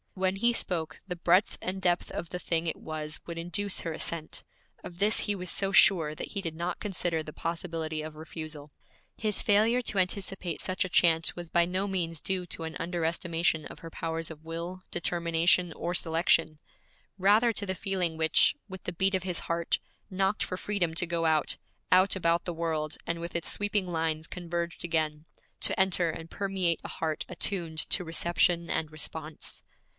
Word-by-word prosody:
When 190 Hz, 0 st, 0 dB
he 235 Hz, +4 st, +3 dB
spoke, 175 Hz, -8 st, -2 dB
the 180 Hz, -, -3 dB
breadth 175 Hz, +3 st, +3 dB
and 190 Hz, +1 st, -3 dB
depth 175 Hz, -1 st, +1 dB
of 170 Hz, -, -5 dB
the 180 Hz, -, -3 dB
thing 165 Hz, -1 st, 0 dB
it -, -, +1 dB
was 155 Hz, -1 st, -5 dB
would 170 Hz, -1 st, -6 dB
induce 180 Hz, +4 st, 0 dB
her 165 Hz, -, -3 dB
assent. 160 Hz, 0 st, -2 dB, 0.4 s
Of 175 Hz, -, -9 dB
this 210 Hz, +2 st, +4 dB
he 205 Hz, -, 0 dB
was 180 Hz, -2 st, -4 dB
so 195 Hz, +2 st, +1 dB
sure 165 Hz, -6 st, +5 dB
that -, -, -5 dB
he 200 Hz, -, -3 dB
did 165 Hz, -4 st, -3 dB
not 170 Hz, +2 st, -3 dB
consider 175 Hz, -5 st, -1 dB
the 155 Hz, -, -8 dB
possibility 165 Hz, -1 st, -3 dB
of 155 Hz, 0 st, -7 dB
refusal. 155 Hz, -1 st, -7 dB, 0.4 s
His 215 Hz, -2 st, +1 dB
failure 220 Hz, +4 st, +4 dB
to 200 Hz, -, -1 dB
anticipate 185 Hz, -2 st, -1 dB
such 185 Hz, +1 st, 0 dB
a 185 Hz, -, -4 dB
chance 165 Hz, -2 st, +3 dB
was 175 Hz, -2 st, -6 dB
by 170 Hz, 0 st, +4 dB
no 185 Hz, +3 st, 0 dB
means 170 Hz, -4 st, -1 dB
due 185 Hz, +1 st, 0 dB
to 165 Hz, -, -5 dB
an 160 Hz, 0 st, -5 dB
under 170 Hz, 0 st, -2 dB
estimation 165 Hz, -1 st, 0 dB
of -, -, -11 dB
her 165 Hz, -, -8 dB
powers 165 Hz, 0 st, -3 dB
of 160 Hz, -1 st, -10 dB
will, 170 Hz, +3 st, -5 dB
determination, 170 Hz, 0 st, +2 dB
or 175 Hz, -, -3 dB
selection; 165 Hz, -2 st, +2 dB, 0.6 s
rather 210 Hz, +5 st, +4 dB
to 205 Hz, -, -2 dB
the 190 Hz, -1 st, -2 dB
feeling 180 Hz, -3 st, -1 dB
which, 160 Hz, 0 st, +5 dB
with 190 Hz, -2 st, -9 dB
the -, -, -3 dB
beat 190 Hz, +3 st, +2 dB
of 185 Hz, -, -1 dB
his 180 Hz, -3 st, 0 dB
heart, 170 Hz, 0 st, 0 dB, 0.3 s
knocked 190 Hz, +2 st, +1 dB
for 185 Hz, -, -4 dB
freedom 185 Hz, -4 st, 0 dB
to 175 Hz, -, +3 dB
go 170 Hz, -1 st, 0 dB
out, 155 Hz, -2 st, +3 dB, 0.3 s
out, 185 Hz, +2 st, +6 dB
about 170 Hz, -1 st, +2 dB
the 175 Hz, -, -2 dB
world, 160 Hz, -2 st, -1 dB
and 170 Hz, 0 st, -1 dB
with 170 Hz, +1 st, -6 dB
its 170 Hz, -, 0 dB
sweeping 205 Hz, -2 st, +1 dB
lines 160 Hz, -2 st, -1 dB
converged 170 Hz, -1 st, -4 dB
again, 155 Hz, -2 st, 0 dB, 0.4 s
to -, -, 0 dB
enter 185 Hz, -3 st, +4 dB
and 160 Hz, +1 st, -6 dB
permeate 190 Hz, -4 st, 0 dB
a -, -, -6 dB
heart 160 Hz, -1 st, -2 dB
attuned 175 Hz, -3 st, -1 dB
to 180 Hz, +4 st, +2 dB
reception 170 Hz, +1 st, +2 dB
and 155 Hz, -1 st, -1 dB
response. 155 Hz, 0 st, -5 dB
170 Hz, 190 wpm, -29 LUFS, 160-185 Hz, 0.6 s, out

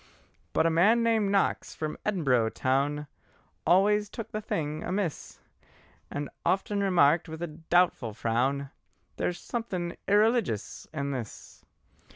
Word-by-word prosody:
But -, -, +3 dB
a 165 Hz, -, +3 dB
man 210 Hz, +8 st, +4 dB
named 225 Hz, -3 st, +2 dB
Knox 200 Hz, -1 st, 0 dB
from 155 Hz, -1 st, -3 dB
Edinboro 130 Hz, -, +2 dB
toun, 140 Hz, +3 st, 0 dB, 0.6 s
Always 205 Hz, +3 st, +4 dB
took 225 Hz, 0 st, -7 dB
the 215 Hz, -, -3 dB
thing 155 Hz, -5 st, -3 dB
amiss, 185 Hz, -4 st, -3 dB, 0.7 s
And 145 Hz, 0 st, -4 dB, 0.2 s
often 200 Hz, +2 st, 0 dB
remarked 170 Hz, -4 st, +3 dB
with 160 Hz, +1 st, -6 dB
a -, -, -1 dB, 0.2 s
doubtful 170 Hz, -, +2 dB
frown: 130 Hz, +5 st, 0 dB, 0.5 s
"There -, -, 0 dB
is 175 Hz, -, -5 dB
something 185 Hz, -6 st, -4 dB
eereligious 210 Hz, -, +1 dB
in 140 Hz, -2 st, -3 dB
this!" 120 Hz, -6 st, -7 dB
170 Hz, 130 wpm, -28 LUFS, 140-205 Hz, 0.7 s, man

